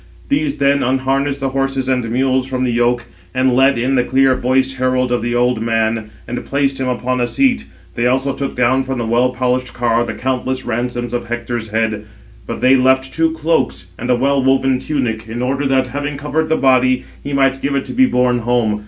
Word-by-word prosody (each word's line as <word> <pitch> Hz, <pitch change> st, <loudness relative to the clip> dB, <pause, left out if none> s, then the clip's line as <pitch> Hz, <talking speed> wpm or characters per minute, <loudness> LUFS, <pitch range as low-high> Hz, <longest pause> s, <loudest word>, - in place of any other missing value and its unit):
These 285 Hz, 0 st, 0 dB
then 140 Hz, 0 st, +2 dB
unharnessed 135 Hz, +2 st, 0 dB
the 135 Hz, -, 0 dB
horses 135 Hz, -1 st, -1 dB
and 125 Hz, -3 st, 0 dB
mules 130 Hz, +1 st, +1 dB
from 130 Hz, -1 st, -2 dB
the 125 Hz, -, +1 dB
yoke, 120 Hz, +1 st, +1 dB, 0.3 s
and 130 Hz, 0 st, +2 dB
led 135 Hz, +1 st, +4 dB
in 125 Hz, +3 st, 0 dB
the 125 Hz, -2 st, +3 dB
clear 130 Hz, +1 st, +3 dB
voiced 130 Hz, +1 st, 0 dB
herald 130 Hz, -1 st, +1 dB
of 125 Hz, -, +1 dB
the 120 Hz, +1 st, -2 dB
old 125 Hz, -1 st, +1 dB
man, 110 Hz, -1 st, 0 dB, 0.2 s
and 125 Hz, -, -4 dB
placed 140 Hz, -1 st, -1 dB
him 130 Hz, -, -1 dB
upon 125 Hz, 0 st, -1 dB
a 120 Hz, -, +1 dB
seat. 250 Hz, -, +1 dB, 0.3 s
They 120 Hz, +5 st, 0 dB
also 135 Hz, +2 st, +1 dB
took 140 Hz, 0 st, -4 dB
down 125 Hz, +2 st, +2 dB
from 135 Hz, 0 st, -3 dB
the 120 Hz, -, -2 dB
well 120 Hz, +3 st, +2 dB
polished 125 Hz, 0 st, -1 dB
car 120 Hz, -1 st, +1 dB
the -, -, -5 dB
countless 130 Hz, 0 st, -2 dB
ransoms 120 Hz, 0 st, -3 dB
of 120 Hz, -1 st, -3 dB
Hector's 120 Hz, -1 st, -4 dB
head. 110 Hz, -1 st, -1 dB, 0.4 s
But -, -, -5 dB
they 130 Hz, +1 st, +5 dB
left 130 Hz, 0 st, +2 dB
two 165 Hz, 0 st, +2 dB
cloaks 160 Hz, -, -1 dB
and 120 Hz, -, -4 dB
a 125 Hz, -, +4 dB
well 135 Hz, +2 st, +1 dB
woven 135 Hz, -1 st, +2 dB
tunic, 120 Hz, -6 st, -3 dB
in 120 Hz, +2 st, -3 dB
order 135 Hz, +2 st, 0 dB
that, 130 Hz, -1 st, +2 dB
having 145 Hz, +3 st, -4 dB
covered 150 Hz, +2 st, -2 dB
the 160 Hz, -, +2 dB
body, 130 Hz, -1 st, +3 dB, 0.2 s
he 145 Hz, -, -5 dB
might 135 Hz, -1 st, +2 dB
give 140 Hz, 0 st, -1 dB
it 135 Hz, -, -1 dB
to -, -, -7 dB
be 260 Hz, +1 st, +4 dB
borne 125 Hz, -, +2 dB
home. 115 Hz, -3 st, 0 dB
130 Hz, 215 wpm, -17 LUFS, 120-135 Hz, 0.4 s, they